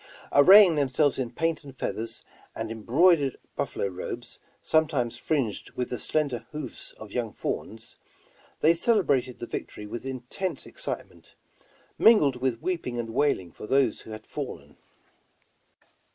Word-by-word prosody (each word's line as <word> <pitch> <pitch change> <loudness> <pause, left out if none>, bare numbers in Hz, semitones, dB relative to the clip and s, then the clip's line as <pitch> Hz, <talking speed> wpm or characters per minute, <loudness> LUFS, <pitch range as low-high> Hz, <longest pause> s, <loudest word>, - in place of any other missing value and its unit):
Arraying 185 +5 +8
themselves 140 0 +2
in 125 -3 -1
paint 165 +5 -1
and 135 -2 -12
feathers, 115 0 -4 0.3
and 110 0 -4
embroidered 140 - +3 0.2
buffalo - - -2
robes 95 -2 -6 0.2
some 160 0 +3
times 125 -7 -1
fringed 135 -10 -2
with 125 - -3
the 125 - -3
slender 145 -5 -1
hoofs 150 -5 -6
of 110 -2 -12
young 115 -2 -2
fawns, 110 +1 -5 0.6
they 160 - +6
celebrated 165 - +1
the - - -6
victory 105 - -6
with 115 +3 -6
intense 130 +8 -4
excitement, - - -7 0.6
mingled 150 - +6
with 125 -2 -1
weeping 165 -10 -2
and 115 -1 -3
wailing 110 - +1
for 105 - -10
those 135 -3 +2
who - - -13
had 110 0 -8
fallen. - - -7
130 Hz, 140 wpm, -27 LUFS, 115-155 Hz, 0.6 s, Arraying